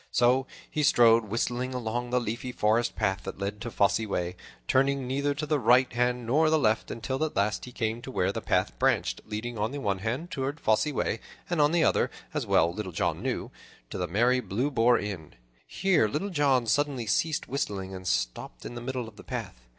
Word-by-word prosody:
So 125 +2 +3 0.2
he 155 - -2
strode 115 -5 +5
whistling 120 +4 -2
along 120 0 -2
the 125 +1 +2
leafy 120 +2 -4
forest 115 +1 +1
path 95 -3 0
that - - -6
led 100 +2 -4
to 120 - -4
Fosse 100 -1 +2
Way, 90 -5 -2 0.3
turning 135 0 +2
neither 140 +3 0
to 150 +1 -3
the 150 -1 +1
right 125 +2 +4
hand 125 0 0
nor 155 +7 +3
the 160 - +4
left, 110 -6 +1
until 130 +5 -3
at 155 - -2
last 105 +2 0
he 125 - -10
came 115 -1 -2
to 130 - -8
where 95 -7 0
the - - -4
path - - +1
branched, - - +1
leading 110 +2 -4
on 110 +2 0
the 145 - -4
one 100 -6 -1
hand 125 - -3
onward 135 +2 -2
to - - -23
Fosse 110 +7 +3
Way, 115 -4 -1 0.3
and 170 -3 +2
on 145 +1 +4
the 170 -1 +3
other, - - +3 0.2
as - - -2
well 85 +1 +3
Little 95 -1 -5
John - - -1
knew, - - -3 0.4
to - - -4
the 90 - -1
merry 120 +8 +3
Blue 125 +5 -1
Boar 120 -1 +4
Inn. 95 -7 -6 0.3
Here 180 - +2
Little 175 - -3
John 140 -6 +2
suddenly 135 +1 0
ceased 150 +8 0
whistling 100 -8 -3
and 95 -1 -7
stopped - - -2
in - - -6
the 120 - -6
middle 125 -1 -3
of 110 - -13
the - - -11
path. - - -6
120 Hz, 215 wpm, -28 LUFS, 105-135 Hz, 0.4 s, strode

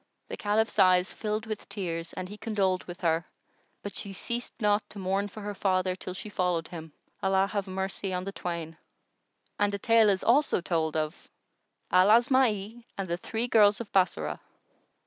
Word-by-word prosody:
The - - -4
Caliph's 215 +2 0
eyes 185 0 +5
filled 215 +1 -3
with 215 -2 -6
tears 170 -5 -4
and 185 - -5
he 205 - -8
condoled 195 -4 0
with 175 0 -9
her; 165 -1 +2 0.6
but 205 - -6
she 200 - -5
ceased 235 +5 -4
not 210 -1 +3
to - - -11
mourn 195 +1 0
for 205 +2 -10
her 205 0 -4
father, 185 -2 +1
till 185 0 -7
she 200 - -7
followed 180 -5 -1
him—Allah 180 +4 -2
have 200 -2 -2
mercy 190 +1 -3
on 180 0 -2
the 195 - -4
twain! 170 -4 -5 0.8
And 205 0 +3
a - - -2
tale 225 +1 +5
is 195 -2 +1
also 280 +2 +4
told 160 -3 -1
of 155 +1 -3 0.6
AL 185 +1 +6
ASMA'I 235 -2 +3
AND 195 -2 -3
THE 170 - 0
THREE 225 +6 -3
GIRLS 210 -3 +5
OF 235 -3 -7
BASSORAH. 190 -1 +1
195 Hz, 175 wpm, -28 LUFS, 180-210 Hz, 0.8 s, AL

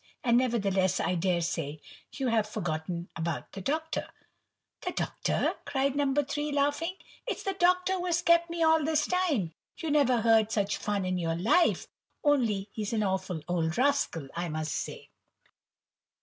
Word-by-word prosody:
And 240 -1 +4
nevertheless 195 -7 +1
I - - 0
dare 180 0 +1
say 160 -3 -3 0.3
you 265 -3 -1
have 220 -2 +1
forgotten 170 -1 -3
about 165 -1 -3
the 195 - -7
Doctor." 315 - -2 0.7
"The - - -2
Doctor!" - - 0
cried 275 0 0
No. 285 -1 +2
3, 290 +1 -1
laughing,—"It's 290 - -2
the 390 - -1
Doctor 365 0 +3
who 365 -1 -2
has 345 0 +1
kept 340 0 +4
me 335 0 -1
all 320 -1 +4
this 310 +1 +2
time. 305 - 0 0.2
You 325 -3 -3
never 260 -5 +3
heard 225 -1 +4
such 205 -2 0
fun 205 -2 -1
in 185 0 -1
your 165 -1 -1
life,—only 230 - +1
he's 215 0 -4
an 215 -2 +1
awful 185 -4 -2
old 170 -2 0
rascal, 260 - +1
I 170 0 -2
must 155 -1 -3
say!" - - -5
230 Hz, 155 wpm, -29 LUFS, 180-295 Hz, 0.7 s, And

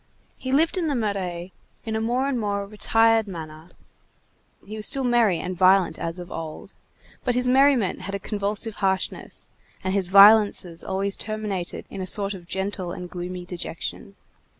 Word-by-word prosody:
He 260 - -4
lived 320 +7 +2
in 335 - -1
the 290 - 0
Marais 190 -5 -3 0.3
in 220 -1 -3
a 220 - -1
more 245 +4 0
and 270 -3 -1
more 200 -2 -2
retired 225 +1 +2
manner; 160 -2 -9 1.0
he 215 - -8
was 215 -1 -1
still 270 - +3
merry 235 -7 +3
and 180 0 -4
violent 185 -2 +4
as 165 +1 -3
of 180 0 -8
old, 160 -1 -7 0.5
but 245 - 0
his 250 0 +1
merriment 260 -5 +3
had 195 +2 -5
a - - -3
convulsive 205 +2 -2
harshness, 190 -1 -2 0.4
and 190 0 -1
his 195 -2 0
violences 200 -3 +6
always 195 +1 -1
terminated 210 -4 -4
in 195 - -6
a 185 - -4
sort 200 +1 0
of 175 -3 -11
gentle 190 -1 -3
and 180 0 -7
gloomy 180 0 -6
dejection. 180 +3 -6
200 Hz, 170 wpm, -24 LUFS, 180-225 Hz, 1.0 s, violences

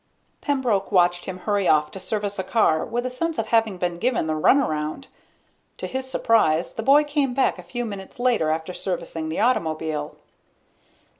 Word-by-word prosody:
Pembroke 250 -10 0
watched 175 -2 +3
him 185 -1 -5
hurry 200 0 0
off 150 -1 +3
to 190 - -8
service 205 0 -3
a - - 0
car 185 -6 +2
with 240 +1 -3
a 255 - -2
sense 330 +5 -2
of - - 0
having 225 -4 +2
been 175 -1 -2
given 245 -5 0
the 160 - -1
runaround. 155 - +1 0.7
To - - -5
his 260 0 -4
surprise, 180 -11 +2
the - - -4
boy 280 +6 +5
came 285 -4 -1
back 265 -8 +1
a - - -6
few 235 +8 -5
minutes 200 -3 -8
later 240 -11 +2
after 160 +3 -2
servicing 170 -4 -4
the 160 - -3
automobile. 160 -9 -1
195 Hz, 175 wpm, -23 LUFS, 165-245 Hz, 0.7 s, boy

